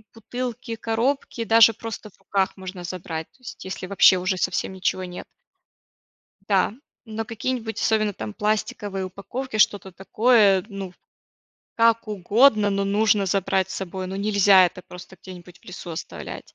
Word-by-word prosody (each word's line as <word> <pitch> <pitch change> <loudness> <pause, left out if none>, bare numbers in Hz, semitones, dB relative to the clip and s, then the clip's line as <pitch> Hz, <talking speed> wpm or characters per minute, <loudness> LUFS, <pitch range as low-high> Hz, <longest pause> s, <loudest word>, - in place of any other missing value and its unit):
бутылки, 245 +1 -5
коробки 230 +2 -1
даже 225 0 +6
просто 225 -1 -8
в - - -28
руках 195 -1 -1
можно 185 -1 -8
забрать, 165 -2 -5
то - - -30
есть 240 - -10
если 185 -1 -6
вообще 190 -1 +5
уже 185 +1 -1
совсем 190 - -1
ничего 185 0 -1
нет. 180 0 -8 1.2
Да, 195 +1 +2 0.3
но 225 0 -5
какие-нибудь 230 -1 -4
особенно 215 -2 +1
там 110 - -7
пластиковые 205 -2 -2
упаковки, 220 +6 -6
что-то 205 -2 +2
такое, 200 0 +3
ну, 195 -3 -7 0.8
как 230 -1 +3
угодно, 210 +2 +3
но 200 0 0
нужно 205 0 +2
забрать 190 0 0
с - - -5
собой, 190 0 -5
ну, 190 - -5
нельзя 200 -2 +5
это 180 +1 -8
просто 180 +1 -12
где-нибудь 180 -1 -12
в - - -27
лесу 180 -1 -9
оставлять. 160 - -8
200 Hz, 150 wpm, -23 LUFS, 185-225 Hz, 1.2 s, даже